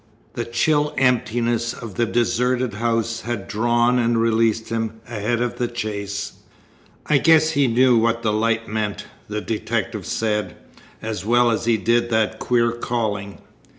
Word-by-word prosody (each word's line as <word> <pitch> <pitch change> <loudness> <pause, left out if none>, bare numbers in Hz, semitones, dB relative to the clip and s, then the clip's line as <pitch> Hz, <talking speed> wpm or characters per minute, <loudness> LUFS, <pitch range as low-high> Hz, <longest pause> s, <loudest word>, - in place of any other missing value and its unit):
The 120 - -3
chill 145 +5 +1
emptiness 120 -2 +1
of 115 -5 -8
the 120 +5 0
deserted 120 +1 0
house 115 +1 -1
had 115 -4 -4
drawn 120 +3 +2
and 115 -1 +2
released 115 -1 +1
him 115 -1 -3
ahead 120 +1 -2
of 120 0 -4
the 120 - +1
chase. 100 -3 -4 0.7
"I 150 -2 +3
guess 160 0 +5
he 140 -3 +2
knew 125 +1 +4
what 115 0 +1
the 105 -2 +1
light 115 +1 0
meant," 105 -1 -3 0.2
the 105 0 -3
detective 110 -4 -3
said, 105 -4 -1 0.5
"as 110 -4 -4
well 120 +2 +3
as 115 0 -1
he 115 -1 +3
did 120 +4 +1
that 110 -2 0
queer 120 -1 +2
calling. 110 -4 -3
115 Hz, 150 wpm, -21 LUFS, 110-120 Hz, 0.7 s, guess